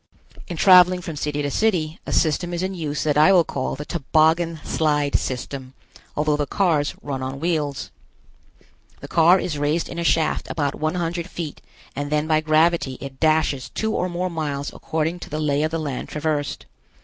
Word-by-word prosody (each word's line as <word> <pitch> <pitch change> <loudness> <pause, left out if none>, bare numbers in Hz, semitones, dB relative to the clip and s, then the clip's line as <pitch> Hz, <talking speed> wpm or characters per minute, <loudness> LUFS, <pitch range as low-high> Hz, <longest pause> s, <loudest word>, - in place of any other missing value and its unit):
In 175 - -5
traveling 180 0 +7
from 165 -2 -6
city 145 0 -2
to 145 - -2
city, 175 -7 0
a - - -3
system 175 +2 +1
is 170 - -2
in 190 +1 -2
use 155 -5 -3
that 150 -1 +2
I 155 +6 +7
will 180 -3 +6
call 130 -4 -3
the 150 - -7
Toboggan 160 +2 +1
Slide 145 -2 0
System, 130 +1 -4 0.4
although 150 0 +2
the 145 -1 -1
cars 160 -5 +1
run 135 -2 -4
on 130 +1 -4
wheels. 150 -4 -2 1.1
The - - -9
car 170 +3 +5
is 150 -6 -3
raised 150 +3 0
in 170 - -6
a - - -1
shaft 165 -1 +1
about 145 -3 -1
one 155 +2 -2
hundred 170 +1 -2
feet 165 -5 -6 0.3
and 145 +1 -4
then 150 0 +1
by 155 -1 +2
gravity 155 -3 +2
it 135 -1 -9
dashes 155 -4 +1
two 220 0 -2
or 180 - 0
more 180 +1 -2
miles 145 -3 -3
according 160 +2 -2
to - - -9
the 155 - -3
lay 145 -1 +1
of 155 - +1
the 165 - -2
land 145 -5 -4
traversed. 150 -2 -2
155 Hz, 190 wpm, -22 LUFS, 145-170 Hz, 1.1 s, traveling